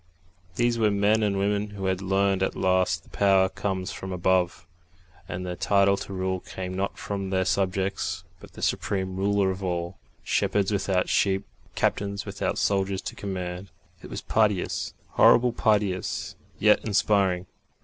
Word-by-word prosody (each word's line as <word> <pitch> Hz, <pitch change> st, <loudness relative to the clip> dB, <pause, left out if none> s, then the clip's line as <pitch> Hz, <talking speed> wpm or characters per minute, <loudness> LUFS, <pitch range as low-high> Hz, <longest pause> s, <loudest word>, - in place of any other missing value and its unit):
These 120 Hz, -1 st, +1 dB
were 110 Hz, -2 st, +4 dB
men 105 Hz, +2 st, +2 dB
and 100 Hz, -2 st, +1 dB
women 100 Hz, +1 st, 0 dB
who 95 Hz, -, -4 dB
had 95 Hz, 0 st, 0 dB
learned 95 Hz, 0 st, +1 dB
at 95 Hz, -, 0 dB
last 90 Hz, -3 st, +1 dB
that -, -, -21 dB
power 95 Hz, -2 st, +4 dB
comes 95 Hz, -2 st, -3 dB
from 95 Hz, -, -7 dB
above, 90 Hz, -1 st, +1 dB, 0.6 s
and 90 Hz, +1 st, -4 dB
their 90 Hz, -1 st, -4 dB
title 100 Hz, +1 st, +3 dB
to 100 Hz, -, -7 dB
rule 95 Hz, -1 st, -1 dB
came 90 Hz, 0 st, -6 dB
not 95 Hz, +1 st, -2 dB
from 100 Hz, -1 st, -4 dB
their 95 Hz, -1 st, +1 dB
subjects 95 Hz, -2 st, -1 dB, 0.2 s
but -, -, -13 dB
from -, -, -27 dB
the -, -, -9 dB
Supreme 95 Hz, -2 st, -1 dB
Ruler 100 Hz, 0 st, +2 dB
of 95 Hz, +1 st, -6 dB
all 85 Hz, -1 st, -3 dB, 0.2 s
shepherds 100 Hz, 0 st, +1 dB
without 95 Hz, -2 st, +1 dB
sheep, 95 Hz, 0 st, +1 dB, 0.3 s
captains 100 Hz, 0 st, -1 dB
without -, -, -2 dB
soldiers 95 Hz, -1 st, 0 dB
to -, -, -5 dB
command. 90 Hz, -1 st, -5 dB, 0.3 s
It -, -, -10 dB
was -, -, -5 dB
piteous 105 Hz, -4 st, 0 dB
horribly 125 Hz, 0 st, +5 dB
piteous, 105 Hz, -5 st, 0 dB, 0.2 s
yet 105 Hz, +1 st, +4 dB
inspiring. 100 Hz, -3 st, +2 dB
95 Hz, 160 wpm, -26 LUFS, 95-100 Hz, 0.6 s, horribly